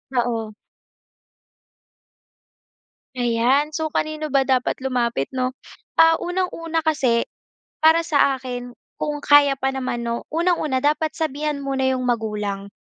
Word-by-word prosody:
Oo. 230 -3 -1 2.6
Ayan. 245 +5 +2
So, 315 +1 -2
kanino 310 0 -2
ba 275 -2 +2
dapat 260 -2 +1
lumapit 240 - -1
'no? 255 0 -2 0.4
Ah, 325 0 +5
unang-una 335 -3 -2
kasi, 265 -7 +2 0.6
para 320 +1 +5
sa 285 -4 +3
akin, 245 -1 -6 0.3
kung 295 -1 -2
kaya 290 -1 +6
pa 270 0 -1
naman 255 -3 -3
'no, 235 0 -4
unang-una 320 -6 +1
dapat 305 +1 +1
sabihan 300 -2 -2
muna 270 -1 -1
'yong 260 -1 0
magulang. 210 -4 -2
270 Hz, 115 wpm, -22 LUFS, 245-310 Hz, 2.6 s, kaya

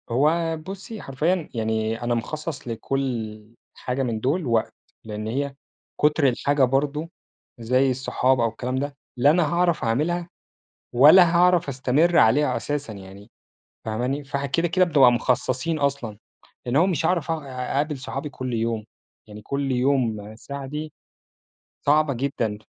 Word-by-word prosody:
هو 160 +6 +1
بُصي، 195 +6 -8
حرفيًا 155 +5 -1
يعني 110 -1 -1
أنا 120 0 0
مخصص 150 +4 -5
لكل 115 -2 -3 0.3
حاجة 125 +2 -3
من 115 -3 -2
دُول 145 +9 0
وقت، 115 -3 0 0.3
لإن 110 0 -6
هي 140 +4 -2 0.5
كُتر 150 -1 +3
الحاجة 140 +3 +1
برضه، 140 +5 0 0.5
زي 130 +3 +2
الصحاب 130 0 +1
أو 115 -1 +2
الكلام 125 +3 -4
ده، 140 +2 -3 0.2
لا 130 +4 +5
أنا 170 -1 +1
هاعرف 175 -1 +1
أعملها 165 +9 0 0.6
ولا 165 +7 +7
هاعرف 175 -3 +4
أستمر 140 +6 +2
عليها 130 +3 +4
أساسًا 145 -6 -4
يعني، 100 +2 -12 0.5
فهماني؟ 125 +6 -2
فإحنا 140 +1 -3
كده، 165 +5 0
كده 185 +2 +3
بنبقى 140 -8 +5
مخصصين 130 +6 0
أصلًا، 140 -7 -2 0.5
لأن 120 +2 -1
هُو 170 - +5
مش 165 -4 0
هاعرف 170 -2 0
أقع 160 -3 -3
أ 125 -1 -4
أقابل 145 +1 0
صحابي 135 +2 -5
كل 130 -3 -6
يوم، 115 -1 -1 0.4
يعني 105 0 -11
كل 140 +3 -2
يوم 125 -5 0
ساعة 140 +4 -7
دي، 150 +2 -6 0.9
صعبة 150 0 +3
جدًا. 120 -5 -2
135 Hz, 145 wpm, -24 LUFS, 120-155 Hz, 0.9 s, ولا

